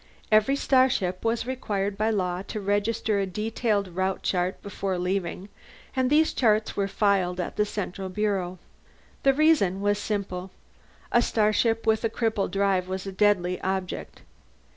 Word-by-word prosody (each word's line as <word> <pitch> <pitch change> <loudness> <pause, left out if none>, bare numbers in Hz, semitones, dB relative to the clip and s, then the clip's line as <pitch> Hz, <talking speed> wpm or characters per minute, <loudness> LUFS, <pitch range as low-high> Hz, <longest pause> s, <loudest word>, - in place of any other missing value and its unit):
Every 215 +6 +4
starship 255 -10 +2
was 230 0 0
required 205 -6 -2
by 215 +2 +1
law 180 -4 -1
to 215 - -4
register 205 +1 0
a 195 - 0
detailed 210 +1 -1
route 190 +2 -2
chart 180 0 0
before 195 -2 -3
leaving, 180 +1 -2 0.5
and 260 -1 +2
these 310 +2 +3
charts 215 -3 +2
were 200 -1 0
filed 195 -3 +1
at 180 - -3
the 210 - +2
central 195 -2 -4
bureau. 185 -2 -1 0.6
The 270 -1 +4
reason 290 - +3
was 205 +1 +1
simple: 195 -3 -3 0.6
a 240 - +5
starship 225 0 +1
with 220 0 +2
a 225 - +2
crippled 220 -3 -1
drive 195 -2 +1
was 190 0 -4
a 195 - -4
deadly 185 -2 +2
object. 190 -1 -4
200 Hz, 150 wpm, -26 LUFS, 185-220 Hz, 0.6 s, a